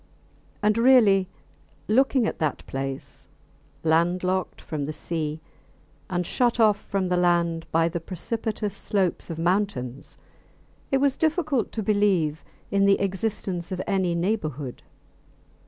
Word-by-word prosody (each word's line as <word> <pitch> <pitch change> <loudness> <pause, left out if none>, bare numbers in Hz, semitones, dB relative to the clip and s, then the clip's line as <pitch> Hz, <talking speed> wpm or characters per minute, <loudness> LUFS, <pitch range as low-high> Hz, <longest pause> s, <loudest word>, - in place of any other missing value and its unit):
And 210 +2 +3
really, 215 -7 +5 0.6
looking 260 +2 +3
at - - -3
that 155 -3 -1
place, 135 0 -6 0.5
landlocked 175 +3 +1
from 145 -3 -4
the 155 - -3
sea 155 -1 -3 0.7
and 180 -1 -1
shut 240 +5 +1
off 210 -2 +4
from 190 -2 -1
the 180 - +2
land 170 -2 +1
by 165 0 +3
the 170 +1 -3
precipitous 210 +4 -3
slopes 195 -3 -1
of 165 - -4
mountains, 175 -8 -1 0.7
it 270 - +4
was 275 0 +2
difficult 310 - 0
to 220 - -2
believe 190 -7 +1 0.3
in 200 0 +3
the 195 - +4
existence 195 -2 -2
of 185 - -3
any 190 -3 0
neighbourhood. 155 - -2
185 Hz, 125 wpm, -25 LUFS, 165-215 Hz, 0.7 s, really